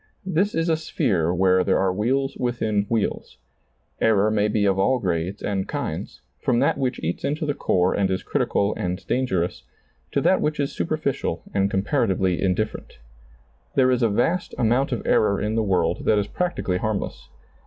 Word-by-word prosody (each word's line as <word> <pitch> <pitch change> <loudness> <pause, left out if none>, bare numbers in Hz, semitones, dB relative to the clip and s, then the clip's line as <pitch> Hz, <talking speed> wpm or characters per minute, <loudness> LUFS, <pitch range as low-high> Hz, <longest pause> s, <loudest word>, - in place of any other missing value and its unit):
This 190 +3 0
is 165 +1 0
a 160 -1 +2
sphere 90 - 0
where 95 0 +3
there 95 - +2
are 95 -1 +1
wheels 135 +7 0
within 110 -4 -1
wheels. 115 -3 -2 0.6
Error 110 -1 +3
may 105 -1 +2
be 105 -1 +1
of 95 -1 +2
all 130 +7 +3
grades 90 -2 -2
and 95 -2 -1
kinds, - - -5 0.2
from 120 - +1
that 135 +4 +2
which 130 -1 -1
eats 85 +2 -3
into 150 +3 -1
the 145 - 0
core 90 -8 +1
and 100 -2 +1
is 95 0 -2
critical 100 +1 0
and 90 -2 -3
dangerous, 95 -9 -1 0.5
to - - +1
that - - +3
which 150 0 -1
is 140 -1 0
superficial 140 - -2
and 100 0 +2
comparatively 95 - 0
indifferent. 95 +3 -2 0.8
There 130 -1 +4
is 125 0 +1
a 115 - +3
vast 165 - 0
amount 125 +5 +2
of 120 - -3
error 100 -2 +3
in 105 +1 -1
the 115 - +1
world 90 -5 0
that 110 - +4
is 105 - +1
practically 105 - -2
harmless. 110 0 -3
105 Hz, 175 wpm, -23 LUFS, 95-130 Hz, 0.8 s, There